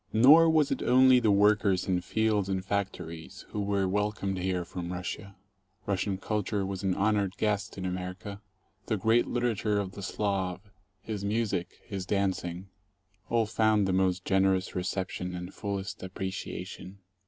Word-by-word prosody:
Nor 150 +9 +7
was 155 -3 +3
it - - -1
only 130 0 +6
the 115 -3 +2
workers 100 -2 +3
in 90 -2 +1
fields 105 0 0
and 95 -1 -2
factories 90 -5 -4
who 105 - -3
were 100 -1 +1
welcomed 100 -1 -1
here 90 -1 -1
from 85 0 -6
Russia. 90 +2 -5 0.5
Russian 100 0 -1
culture 105 0 -1
was 95 -1 -4
an 95 -2 0
honored 100 -2 +1
guest 105 -2 -1
in 95 - -4
America. 90 +2 -5 0.5
The - - 0
great 115 +2 +3
literature 115 -4 0
of 95 -2 -3
the 100 - -9
Slav, 100 -1 -2 0.3
his 105 -3 -4
music, 105 -4 -1
his 95 -4 -5
danc 100 -2 0
ing 90 +2 -6 0.3
— 95 +1 -39
all 115 -1 +2
found 110 -2 +2
the 95 - +1
most 95 -1 +1
generous 95 -1 +2
reception 90 0 -3
and 90 +1 -6
fullest 100 -1 -4
appreciation. 95 0 -6
100 Hz, 155 wpm, -29 LUFS, 95-105 Hz, 0.5 s, Nor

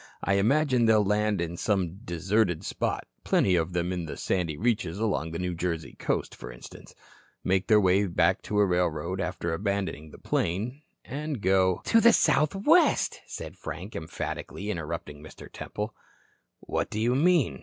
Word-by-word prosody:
I 100 0 +2
imagine 130 +2 +3
they'll 110 -2 +5
land 105 0 +1
in 85 0 -3
some 95 -3 0
deserted 90 0 0
spot - - -2 0.2
plenty 95 - +3
of 85 +1 0
them 90 +1 -1
in 85 -2 -4
the - - -6
sandy 85 -5 -1
reaches 105 -5 0
along 105 -7 -1
the 80 - -5
New 90 0 -2
Jersey 85 -1 -3
coast, - - -1
for - - -9
instance - - -13 0.5
make 95 0 +1
their 110 -2 +6
way 95 +1 +3
to 90 +4 +1
a 105 - +6
railroad, 90 0 0
after 90 -2 -2
abandoning 95 -4 -2
the - - -13
plane, 110 - -2 0.2
and 145 0 -4
go 95 -1 +2
" - - -28
"To 225 - +4
the 235 +1 +7
Southwest," 195 - +3
said - - -7
Frank, 100 +5 -7
emphatically, 95 +5 -5
interrupting 80 -4 -5
Mr. 80 - -11
Temple. 105 +1 -5 0.7
"What - - -2
do 105 - -3
you 120 +3 +2
mean?" 140 - +3
95 Hz, 165 wpm, -27 LUFS, 85-110 Hz, 0.7 s, the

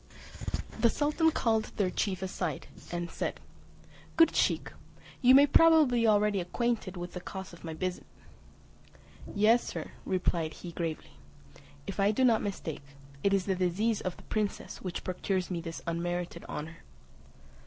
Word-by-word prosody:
The 235 - +5
sultan 300 +5 +2
called 225 -7 +1
their 190 -3 +1
chief 190 -2 -1
aside, 180 -5 -3 0.3
and 175 -1 -3
said, - - -3 0.8
"Good 330 - +6
Sheik, - - +1 0.5
you 255 0 +7
may 280 +1 +9
probably 305 -4 +5
be 230 - +3
already 210 -1 +3
acquainted 210 +1 -1
with 175 0 -6
the 180 - -5
cause 190 0 -7
of 170 - -13
my 160 -1 -5
visit." 180 +2 -3 1.3
"Yes, 220 +4 +5
Sir," - - -6
replied 175 -3 0
he 175 - -8
gravely, 165 -2 -4 0.7
"if 195 0 -6
I 200 +1 +4
do 215 +5 +1
not 230 -3 +4
mistake, 190 -7 -4 0.4
it 200 - +3
is 195 -2 +2
the 195 - +1
disease 190 +5 0
of 185 - -4
the - - -14
princess 210 -2 -3
which 180 -3 -4
procures 185 0 -2
me 170 -2 -2
this 165 -1 -7
unmerited 170 +1 -3
honour." 160 +2 -6
190 Hz, 155 wpm, -30 LUFS, 175-225 Hz, 1.3 s, may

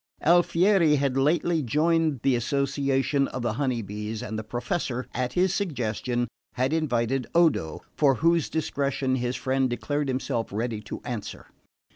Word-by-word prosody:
Alfieri 175 0 +4
had 140 -2 0
lately 160 +4 +2
joined 155 +1 +1
the 135 -2 +3
association 140 +2 0
of 125 - -5
the 120 -2 0
Honey 125 -4 0
Bees, 105 +2 -5
and 110 - -5
the 110 - -3
Professor, 120 +3 -3
at 125 -1 -2
his 185 +1 +2
suggestion, 120 - -1 0.3
had 130 +4 0
invited 130 -5 0
Odo, 155 - +2
for 140 -3 +3
whose 165 +3 +2
discretion 140 -4 -1
his 125 0 -2
friend 130 +1 0
declared 145 +4 -2
himself 130 -3 -1
ready 110 +1 -2
to - - -7
answer. 120 -4 -6
135 Hz, 145 wpm, -26 LUFS, 120-155 Hz, 0.3 s, Alfieri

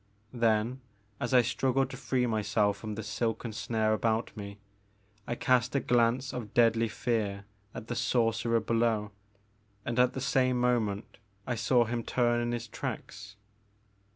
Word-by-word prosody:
Then, 115 +1 +1 0.4
as 120 - -2
I 125 -2 +6
struggled 130 +2 0
to - - -6
free 125 -2 0
myself 105 -2 +1
from 110 -1 -6
the 110 - -5
silken 115 +1 -2
snare 110 0 0
about 110 +1 0
me, 100 -2 -7 0.7
I 120 - -2
cast 125 +1 +2
a - - +4
glance 125 +2 +1
of 115 -5 -6
deadly 115 -1 +4
fear 105 -4 -2 0.3
at - - -6
the 120 - -4
sorcerer 115 -1 +1
below, 115 -2 0 0.7
and 120 +1 -1
at 125 0 +4
the - - -4
same 130 -2 +2
mo 125 0 +3
ment 105 -1 -5 0.3
I 125 - -1
saw 120 +1 +3
him 120 +1 -2
turn 120 0 +1
in 120 0 -1
his 120 0 -3
tracks. 105 -1 -6
115 Hz, 155 wpm, -30 LUFS, 110-125 Hz, 0.7 s, I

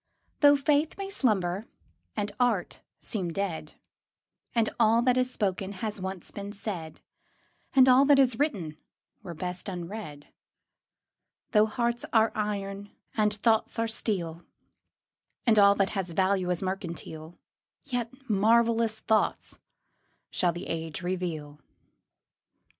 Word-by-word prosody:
Though 290 -1 +7
faith 295 +2 +1
may 395 0 -5
slumber 200 - 0 0.5
and 205 -1 -1
art 235 -8 0 0.2
seem 185 -6 -3
dead, 165 -5 -3 0.8
And 230 -2 +3
all 230 +1 +4
that 250 0 +3
is 255 0 +1
spoken 195 -3 -2
has 210 +1 -4
once 190 -1 -5
been 200 0 -7
said, 185 -6 -6 0.7
And 260 -1 +7
all 255 +1 +7
that 285 0 +6
is 255 -4 +3
written 185 - -1 0.4
were 175 -5 -8
best 180 +3 -4
unread; 175 -5 -7 1.2
Though 215 -1 +5
hearts 235 +2 -1
are 220 -1 +4
iron 205 -1 -3 0.3
and 210 -1 +3
thoughts 220 +2 +1
are 230 0 +1
steel, 175 -7 -2 1.0
And 220 -3 +5
all 200 0 +7
that 195 -1 +1
has 190 -4 -3
value 190 0 +1
is 180 +1 -1
mercantile, 170 -3 -5 0.5
Yet 245 -4 -3 0.2
marvellous 225 +1 +3
truths 220 -1 +1 0.7
shall 180 -2 +2
the 175 +3 -7
age 165 0 -4
reveal. 165 -5 -4
205 Hz, 125 wpm, -28 LUFS, 180-230 Hz, 1.2 s, Though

